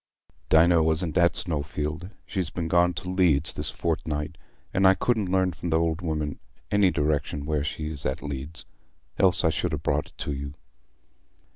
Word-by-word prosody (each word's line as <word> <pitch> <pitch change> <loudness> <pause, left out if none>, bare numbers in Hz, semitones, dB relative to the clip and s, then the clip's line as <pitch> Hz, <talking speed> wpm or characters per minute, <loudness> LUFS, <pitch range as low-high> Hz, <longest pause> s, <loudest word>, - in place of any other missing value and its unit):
"Dinah 85 +1 +5
wasn't 80 +1 +1
at 85 0 +4
Snowfield. 75 +1 -2 0.2
She's 95 -5 -2
been 85 -2 -3
gone 85 +1 +3
to 90 - -5
Leeds 85 -5 +3
this - - -1
fortnight, 80 -1 -2 0.4
and 95 0 +4
I 95 - +6
couldn't 110 -5 0
learn 95 -1 +2
from 85 +2 -5
th' 80 - +2
old 80 +1 +1
woman 75 -3 -2 0.3
any 100 -2 +4
direction 75 -2 -1
where 75 -1 0
she 75 +1 -4
is 70 -3 -5
at 65 - -2
Leeds, 75 +3 -6 0.5
else 95 -2 +4
I 80 - +4
should 80 +2 -2
ha' - - 0
brought 75 0 0
it - - -8
you." 70 0 -4
80 Hz, 170 wpm, -26 LUFS, 75-90 Hz, 0.5 s, I